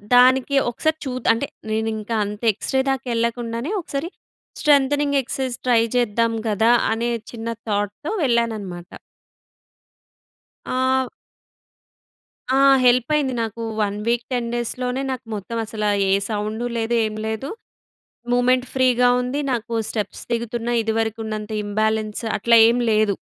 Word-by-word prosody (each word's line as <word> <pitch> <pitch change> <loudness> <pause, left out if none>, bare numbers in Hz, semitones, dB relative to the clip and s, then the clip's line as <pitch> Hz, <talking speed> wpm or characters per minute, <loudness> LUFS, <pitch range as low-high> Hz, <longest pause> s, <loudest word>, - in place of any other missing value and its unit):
దానికి 260 +2 +5 0.2
ఒకసారి 315 +6 0
చూద్ 255 -2 -4
అంటే 235 +5 -2 0.2
నేనింక 220 0 -2
అంత 210 +3 -7
ఎక్స్‌రే 265 +6 -1
దాకా 270 0 -3
వెళ్ళకుండానే 235 - -2
ఒకసారి 295 +1 -4 0.5
స్ట్రెంతెనింగ్ 285 -1 +3
ఎక్సర్‌సైజెస్ 260 -1 -3
ట్రై 235 -2 +5 0.2
చేద్దాం 230 -1 +1 0.2
గదా! 220 +3 +3 0.2
అనే 235 +1 -1 0.2
చిన్న 230 -1 -7 0.2
థాట్‌తో 205 - -2
వెళ్ళాననమాట. 220 -8 -1 1.8
ఆహ్ 260 0 +1 1.5
ఆ! - - +4 0.3
హెల్ప్ 245 0 +4
అయింది 275 -4 +1
నాకు 225 +1 -5 0.2
1 205 0 -1
వీక్ 235 0 +1
10 240 -2 -1
డేస్‌లోనే 250 +2 -2
నాకు 255 -1 -5
మొత్తం 210 +3 -5
అసల 215 -1 -4 0.2
ఏ - - +3 0.2
సౌండు 215 +2 -2
లేదు 230 +1 0
ఏం 215 - -4
లేదు. 220 +6 -3 0.8
మూమెంట్ 250 +1 +3
ఫ్రీగా 250 -1 +4
ఉంది. 250 +4 -2
నాకు 235 -1 -3 0.2
స్టెప్స్ 210 -3 -4
దిగుతున్న 235 0 -2
ఇదివరకు 225 0 -1
ఉన్నంత 215 0 -5
ఇంబాలెన్స్ 215 +1 -1 0.2
అట్లా 230 +3 +4
ఏమి 240 +1 +2
లేదు. 215 -1 +3
235 Hz, 125 wpm, -22 LUFS, 220-255 Hz, 1.8 s, దానికి